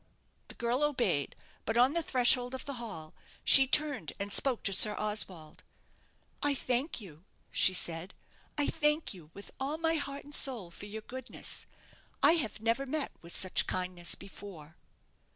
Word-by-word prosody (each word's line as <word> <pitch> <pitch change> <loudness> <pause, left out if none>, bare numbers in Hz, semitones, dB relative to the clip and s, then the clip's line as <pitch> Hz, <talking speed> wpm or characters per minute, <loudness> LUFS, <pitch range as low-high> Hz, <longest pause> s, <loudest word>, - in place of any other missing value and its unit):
The - - -11
girl 240 +3 -1
obeyed; 240 - -1 0.3
but 225 +2 -3
on 250 +4 +4
the 340 - 0
threshold 250 -3 +2
of 260 - -9
the 280 - -5
hall 165 -9 -8 0.3
she 270 -1 +9
turned 270 - +1
and 200 0 -4
spoke 260 -4 +2
to 195 - -1
Sir 210 +2 +7
Oswald. 190 -7 -4 0.8
"I 290 -1 +2
thank 255 +3 -1
you," 170 -6 -13 0.3
she 185 - +5
said; 170 +1 -1 0.4
"I 290 - +2
thank 300 -2 0
you 170 -5 -15
with 200 - -11
all 280 +3 -3
my 325 0 0
heart 280 -1 -6
and 290 - -14
soul 235 -12 +2
for 200 +4 -10
your 215 +1 -8
goodness. 260 +2 -6 0.6
I - - +7
have 245 -10 -2
never 235 +5 -1
met 300 +2 -2
with 170 0 -5
such 185 - +1
kindness 180 -1 -2
before." 190 -6 -12
235 Hz, 165 wpm, -30 LUFS, 185-275 Hz, 0.8 s, she